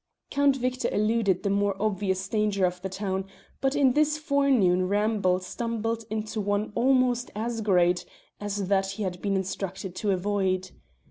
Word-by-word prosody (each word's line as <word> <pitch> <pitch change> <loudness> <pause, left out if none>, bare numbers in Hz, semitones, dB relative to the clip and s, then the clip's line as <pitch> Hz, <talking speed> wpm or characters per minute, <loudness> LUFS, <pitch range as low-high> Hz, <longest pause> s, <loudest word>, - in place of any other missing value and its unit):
Count 280 -1 +3
Victor 255 0 -1
eluded 215 -2 +1
the 200 - +1
more 200 -1 +1
obvious 190 -2 -1
danger 210 -2 +1
of 180 0 -2
the 190 - -4
town, 190 0 -3 0.3
but 270 +1 0
in 270 -3 +4
his 300 +1 +2
forenoon 265 -12 +2
ramble 205 -2 +2
stumbled 230 +3 -3
into 215 0 -3
one 205 +1 -1
almost 250 -1 +2
as 225 +1 -2
great 180 -4 +3 0.4
as 205 -2 -3
that 195 0 +1
he 210 - -4
had 180 -2 -4
been 200 -1 0
instructed 190 0 -3
to 210 - -1
avoid. 190 -1 0
205 Hz, 155 wpm, -27 LUFS, 190-230 Hz, 0.4 s, in